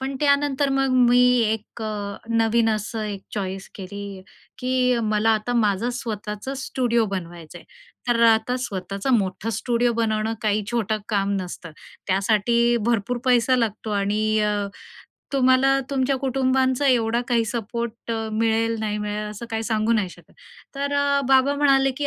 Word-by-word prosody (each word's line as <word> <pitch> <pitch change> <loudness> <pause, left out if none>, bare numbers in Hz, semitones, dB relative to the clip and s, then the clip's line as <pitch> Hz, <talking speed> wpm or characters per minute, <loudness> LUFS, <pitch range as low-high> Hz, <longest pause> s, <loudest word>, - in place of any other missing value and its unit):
पण 270 +1 -3
त्यानंतर 285 -1 +2
मग 270 -1 +1 0.2
मी, 245 +1 +5 0.3
एक 220 +1 -6
अ, 215 - -2 0.4
नवीन 225 0 +2
असं, 215 +1 -4
एक 205 -2 -5
चॉईस 190 -1 -4
केली, 200 0 -8 0.4
की 250 -1 +1
मला 215 +1 +2
आता 215 +3 -2
माझं 220 0 +1
स्वतःचं 210 +3 -5
स्टुडिओ 245 -3 0
बनवायचं 170 -3 -7
आहे, - - -17 0.4
तर 235 -1 +2
अ, - - +8
आता 240 +3 -1
स्वतःचं 195 +4 -4
मोठं 190 +3 -3
स्टुडिओ 240 0 +1
बनवणं 220 -1 0
काही 210 0 +1
छोटं 220 -3 0
काम 200 -2 0
नसतं. 175 -2 -7 0.4
त्यासाठी 220 +5 +2
भरपूर 240 +1 0
पैसा 250 0 +3
लागतो 220 -2 -2
आणि 215 +2 +1
अ, 210 0 +1 0.8
तुम्हाला 260 0 +4 0.2
तुमच्या 270 0 +1
कुटुंबांचा 260 +1 +1
एवढा 235 -2 +2
काही 235 -2 +2
सपोर्ट 235 +1 -4 0.2
मिळेल, 225 +1 +1
नाही 210 -1 -2
मिळेल, 210 0 -3
असं 215 +3 -8
काही 225 0 -2
सांगू 220 0 0
नाही 210 -5 +1
शकत. - - -17 0.4
तर 280 +1 -2
अ, 280 0 +2
बाबा 270 +1 +4
म्हणाले, 270 -2 +4
की 290 - -1
230 Hz, 150 wpm, -23 LUFS, 210-255 Hz, 0.8 s, अ